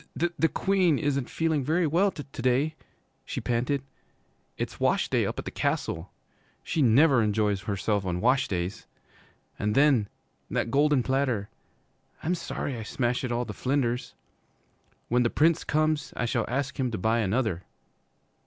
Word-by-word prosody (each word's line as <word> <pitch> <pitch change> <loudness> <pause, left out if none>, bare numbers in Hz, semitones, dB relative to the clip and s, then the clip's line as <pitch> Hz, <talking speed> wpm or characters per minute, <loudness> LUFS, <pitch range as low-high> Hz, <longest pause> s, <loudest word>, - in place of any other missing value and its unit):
'Th 170 +5 +1
the 165 - +5
Queen 185 -6 +2
isn't 140 -3 -1
feeling 160 -3 0
very 165 +6 +1
well 175 +7 +3
to 150 -6 -7 0.2
day,' 130 +5 +2 0.5
she - - -4
panted. 125 +3 -1 0.7
'It's - - -4
wash - - +2
day - - +2
up - - -4
at - - -5
the - - -4
Castle. 85 +3 -2 0.5
She 160 - -1
never 135 +2 +5
enjoys 105 -2 +1
herself 100 0 -1
on 90 -2 -2
wash 130 +6 +3
days. 90 +2 -3 0.7
And 105 +1 0
then 135 -7 +4 0.4
that 115 - -1
golden 145 -1 +3
platter 130 -6 0 0.7
I'm 170 - +1
sorry 145 -5 -3
I 115 - -5
smashed 120 +3 -1
it 125 - -2
all 120 +1 0
to 105 - -6
flinders! 125 0 -1 0.9
When 125 +1 +2
the 120 - +2
Prince 160 +5 +3
comes 155 0 0
I 120 - 0
shall 120 -1 0
ask 140 +3 -2
him 130 -2 +1
to 110 - -3
buy 110 +5 +1
another.' 110 -3 0
125 Hz, 160 wpm, -27 LUFS, 110-145 Hz, 0.9 s, the